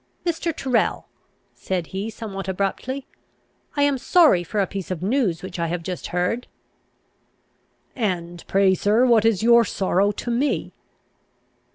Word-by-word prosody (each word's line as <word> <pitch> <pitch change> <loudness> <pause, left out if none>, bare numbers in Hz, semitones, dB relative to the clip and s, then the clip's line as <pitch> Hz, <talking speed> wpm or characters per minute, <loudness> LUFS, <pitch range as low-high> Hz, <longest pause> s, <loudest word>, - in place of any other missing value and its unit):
"Mr. 335 0 -1
Tyrrel," 260 -6 0 0.5
said 180 -3 -3
he, 195 +6 -4
somewhat 195 -4 -7
abruptly, 200 +8 -2 0.7
"I 285 - +3
am 285 -2 +2
sorry 300 - +4
for 205 +5 -3
a 195 - +3
piece 195 0 -6
of 180 -2 -4
news 205 -6 0
which 185 -2 -7
I 170 - 0
have 170 0 -3
just 180 0 -5
heard." 180 +8 -1 1.5
"And 175 -7 -3
pray, 195 -1 +4
sir, 210 +6 +3
what 230 -3 +4
is 220 -3 +2
your 235 0 +6
sorrow 195 -1 +1
to 240 - -4
me?" 265 +5 -1
200 Hz, 145 wpm, -23 LUFS, 185-240 Hz, 1.5 s, your